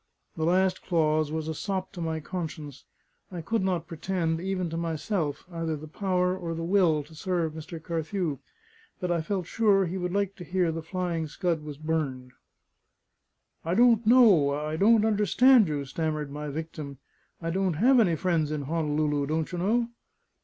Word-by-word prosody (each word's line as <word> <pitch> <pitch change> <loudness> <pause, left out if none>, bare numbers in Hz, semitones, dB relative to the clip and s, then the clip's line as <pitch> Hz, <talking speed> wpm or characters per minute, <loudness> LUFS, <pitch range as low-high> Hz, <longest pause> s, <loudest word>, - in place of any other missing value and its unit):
The 160 - -1
last 185 +2 +2
clause 155 -3 +1
was 160 0 -3
a 160 - -2
sop 190 +3 -3
to 175 - -8
my 160 -1 -2
conscience: 155 -4 -6 0.5
I 175 -2 -5
could 225 +7 -1
not 180 -3 0
pretend, 165 0 -2
even 185 -1 -2
to - - -4
myself, 165 -1 -2
either 165 -2 -2
the 155 +2 -9
power 180 +1 0
or 170 -3 -4
the 165 - -4
will 170 -4 +3
to 155 +3 -17
serve 170 -1 -1
Mr. 160 +1 -8
Carthew; 165 -2 -3 0.6
but 180 -2 -2
I 170 -1 +1
felt 185 +2 -2
sure 200 0 +3
he 180 +2 -3
would 180 0 -2
like 200 0 -1
to 180 - -8
hear 175 -1 0
the 165 +1 -4
Flying 170 -1 -3
Scud 170 0 -1
was 150 -2 -8
burned. 145 -5 -2 1.3
"I 170 +2 -1
don't 235 0 +5
know 215 - +6
I 150 +2 -2
I - - -2
don't 215 +5 +4
understand 220 +2 +5
you," 145 -2 -2
stammered 150 0 -3
my 150 +1 -5
victim. 150 -2 -6 0.4
"I 165 -1 -3
don't 190 0 0
have 245 - +4
any 180 -7 +3
friends 165 -3 0
in 150 -2 -2
Honolulu, 150 -1 0
don't 160 +2 -1
you 175 - -3
know?" 230 +6 +1
165 Hz, 180 wpm, -27 LUFS, 155-190 Hz, 1.3 s, know